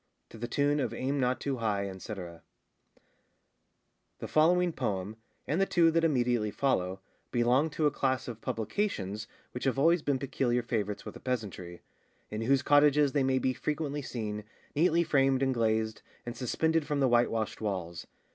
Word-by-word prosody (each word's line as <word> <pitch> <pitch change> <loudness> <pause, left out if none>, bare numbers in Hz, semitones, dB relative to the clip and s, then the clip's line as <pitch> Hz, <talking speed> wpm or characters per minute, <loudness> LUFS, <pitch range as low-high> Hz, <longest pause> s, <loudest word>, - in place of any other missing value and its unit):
To 115 - -12
the 120 - -3
tune 145 +4 +1
of 120 -4 -2
Aim 135 +4 -1
not 125 0 +1
too 140 -2 -2
high, 100 -4 -1
&c. 95 +3 -7
[THE 85 -3 -8 1.9
following 175 +2 +3
poem, 105 -5 -3 0.3
and 160 +6 0
the 195 - +3
two 165 -2 +4
that 165 0 +2
immediately 120 -8 +2
follow, 95 -7 0 0.3
belong 125 +5 +2
to 155 +1 -1
a 150 - +4
class 130 -3 -1
of 115 -2 -7
publications 110 - -2 0.2
which 125 - -5
have 135 0 +1
always 165 +4 +4
been 140 -2 0
peculiar 125 -2 0
favourites 105 -3 -2
with - - -7
the - - -11
peasantry, 100 -8 -4 0.5
in 110 +1 -3
whose 135 +4 +2
cottages 145 -1 +5
they 145 - +1
may 130 0 +2
be 130 0 +1
frequently 150 0 -3
seen, 105 -5 -4 0.3
neatly 170 +2 +3
framed 135 -4 +2
and 135 -1 +2
glazed, 110 -2 0 0.2
and 120 0 -5
suspended 160 +5 0
from 145 -1 -1
the 135 - +4
white 120 0 +4
washed 110 0 -3
walls. 90 -5 -4
125 Hz, 170 wpm, -30 LUFS, 110-145 Hz, 1.9 s, cottages